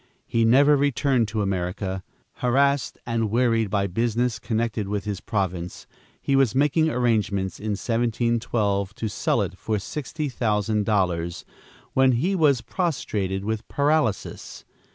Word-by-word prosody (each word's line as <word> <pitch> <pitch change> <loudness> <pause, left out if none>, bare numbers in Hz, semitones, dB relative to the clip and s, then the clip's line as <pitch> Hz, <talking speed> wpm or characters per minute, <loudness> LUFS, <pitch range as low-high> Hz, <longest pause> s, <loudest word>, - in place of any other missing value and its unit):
He 115 -2 +1
never 140 +6 +6
returned 140 -4 +2
to 105 0 -1
America. 95 0 -2 0.3
Harassed 140 +2 +1
and 115 -2 -1
wearied 115 -2 +2
by 100 0 +1
business 115 +5 0
connected 110 -2 -2
with 105 0 -3
his 105 -2 -3
province, 90 -4 -3 0.3
he 140 - 0
was 135 -3 +3
making 150 +3 +3
arrangements 105 - 0
in 105 0 -2
1712 115 -3 0
to 110 - -3
sell 105 - 0
it - - -5
for 110 -1 -1
sixty 150 - -4
thousand 105 -4 0
dollars, 90 -5 0 0.5
when 130 -1 +4
he 160 +12 +1
was 145 -8 +3
prostrated 100 - -2
with 110 0 -3
paralysis. 145 -6 -1
115 Hz, 130 wpm, -24 LUFS, 100-130 Hz, 0.5 s, never